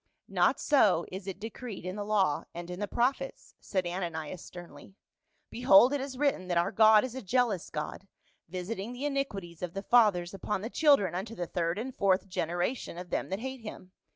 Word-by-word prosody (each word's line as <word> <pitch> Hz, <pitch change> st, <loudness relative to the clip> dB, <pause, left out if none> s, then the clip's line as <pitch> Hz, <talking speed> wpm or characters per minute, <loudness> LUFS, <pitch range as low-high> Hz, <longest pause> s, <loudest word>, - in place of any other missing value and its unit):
" -, -, -61 dB
Not -, -, +2 dB
so 210 Hz, -, +3 dB
is 190 Hz, +1 st, -7 dB
it 195 Hz, -1 st, -5 dB
decreed 225 Hz, -2 st, -7 dB
in 185 Hz, +1 st, -4 dB
the 205 Hz, -, -3 dB
law 200 Hz, -7 st, +1 dB
and 175 Hz, +1 st, -6 dB
in 180 Hz, -, -6 dB
the 205 Hz, -, -2 dB
prophets," 265 Hz, +5 st, -1 dB
said 185 Hz, -3 st, -2 dB
Ananias 175 Hz, -2 st, -4 dB
sternly. 175 Hz, +2 st, -12 dB, 0.3 s
" -, -, -46 dB
Behold 245 Hz, +1 st, +6 dB
it 285 Hz, -, 0 dB
is 265 Hz, -1 st, -6 dB
written 275 Hz, -10 st, 0 dB
that 175 Hz, -1 st, 0 dB
our 175 Hz, +4 st, +2 dB
God 215 Hz, 0 st, +6 dB
is 255 Hz, -2 st, -4 dB
a 260 Hz, -, -5 dB
jealous 225 Hz, -3 st, 0 dB
God, 150 Hz, +5 st, -5 dB, 0.4 s
visiting 195 Hz, +5 st, -4 dB
the 255 Hz, +4 st, -5 dB
iniquities 205 Hz, -, -3 dB
of 180 Hz, 0 st, -5 dB
the 195 Hz, -, -4 dB
fathers 205 Hz, -8 st, +4 dB
upon 195 Hz, 0 st, -3 dB
the 225 Hz, +4 st, -5 dB
children 280 Hz, -, +4 dB
unto 200 Hz, +6 st, -4 dB
the 175 Hz, -, -3 dB
third 170 Hz, +1 st, -1 dB
and 255 Hz, +4 st, -5 dB
fourth 195 Hz, -1 st, +2 dB
generation 175 Hz, +3 st, -2 dB
of 180 Hz, 0 st, -8 dB
them -, -, -1 dB
that 190 Hz, +3 st, -3 dB
hate 265 Hz, 0 st, -5 dB
him. 210 Hz, -4 st, -9 dB
195 Hz, 205 wpm, -30 LUFS, 180-240 Hz, 0.4 s, Behold